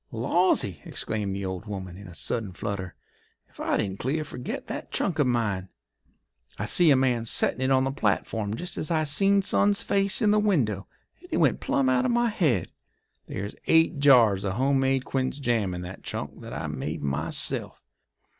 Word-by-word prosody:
'" - - -44
"Lawsy!" 115 - +1
exclaimed 105 -3 -3
the 100 0 -4
old 95 +3 -5
woman, 95 -3 -6
in 100 +1 -11
a 90 - -11
sudden 105 -2 -2
flutter, 95 -1 -5 0.5
"ef - - -23
I - - 0
didn't 95 0 -2
clear 150 +5 -1
forget 125 -4 -6
that - - -6
trunk 175 -5 -1
of 145 - +3
mine! 105 -6 -1 0.9
I - - -3
see 175 -2 +4
a 140 - +7
man 125 -3 +1
settin' 115 +2 0
it 130 - +1
on 130 -1 +4
the 135 - 0
platform 105 -3 -1
jest 175 +9 -4
as 155 - -2
I 160 -2 +1
seen 195 +7 +3
son's 200 +1 +2
face 195 0 +2
in 215 -4 +3
the 210 - +4
window, 125 - +1 0.3
and - - -16
it - - 0
went - - +3
plum 135 - +1
out 130 -1 +2
of - - +1
my 240 0 +2
head. 150 - +1 0.6
There's 100 +2 -5
eight 160 -1 +4
jars 120 -9 +5
of 95 -2 -1
home 135 +5 +2
made 135 0 +1
quince 130 0 -2
jam 115 -8 0
in 90 - -5
that 90 +1 -8
trunk - - -6
that - - -9
I - - -4
made - - -4
myself. 70 -1 -1
125 Hz, 195 wpm, -26 LUFS, 100-155 Hz, 0.9 s, a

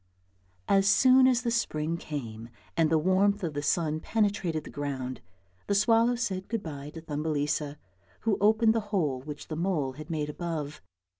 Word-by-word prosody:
As 195 0 +4
soon 255 +4 +6
as 250 -1 +2
the 235 - 0
spring 165 -8 -1
came 120 -9 -6 0.3
and 165 -2 +3
the 160 - +3
warmth 190 +5 +2
of 165 -3 -2
the 145 - -2
sun 155 +1 0
penetrated 200 -5 0
the - - -10
ground, 135 -3 -4 0.5
the 200 - +1
swallow 230 +3 +4
said 195 -6 -3
good 230 -3 -2
bye 145 -3 -6
to 165 - -7
Thumbelisa, 150 -1 -2 0.4
who 220 -3 +1
opened 220 +2 +4
the 225 - +1
hole 150 -11 0
which 145 +1 -8
the 155 - -4
mole 160 -5 0
had 150 +3 -10
made 155 -2 -2
above. 150 -2 -4
165 Hz, 170 wpm, -28 LUFS, 150-205 Hz, 0.5 s, soon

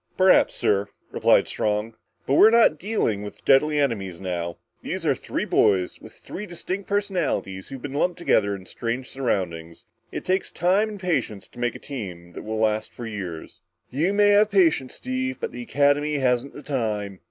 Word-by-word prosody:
"Perhaps, 185 0 +5
sir," 100 0 +1 0.2
replied - - +3
Strong. 105 +1 -1 0.3
"But 135 - 0
we're 210 +9 +8
not 225 -9 +4
dealing 180 - -1
with 105 0 -9
deadly 150 +2 +4
enemies 100 -11 -1
now. 85 -2 -4 0.2
These - - -4
are - - +4
three - - -4
boys, 90 -2 +2
with - - -12
three 210 +2 -8
distinct 185 +2 -5
personalities 180 - -1
who've 135 -2 -8
been 145 -2 -5
lumped 175 +4 0
together 100 - +2
in 95 -1 -11
strange 120 +5 -4
surroundings. 85 -10 -3 0.3
It - - -5
takes 185 +1 0
time 195 +5 +2
and 210 -2 -8
patience 165 - -2
to 120 - -14
make 120 -1 -1
a - - -5
team 90 -10 -8
that - - -7
will 110 0 -4
last 110 0 0
for 120 - -8
years." 95 -7 -7 0.3
"You 155 +9 +1
may 205 0 +4
have 205 +1 +5
the 200 - -2
patience, 155 -8 +3
Steve, 260 0 -3
but 465 - -3
the - - -7
Academy 145 -7 +2
hasn't 130 -1 +1
the 145 - -10
time." 105 -8 -2
135 Hz, 185 wpm, -24 LUFS, -, 0.3 s, we're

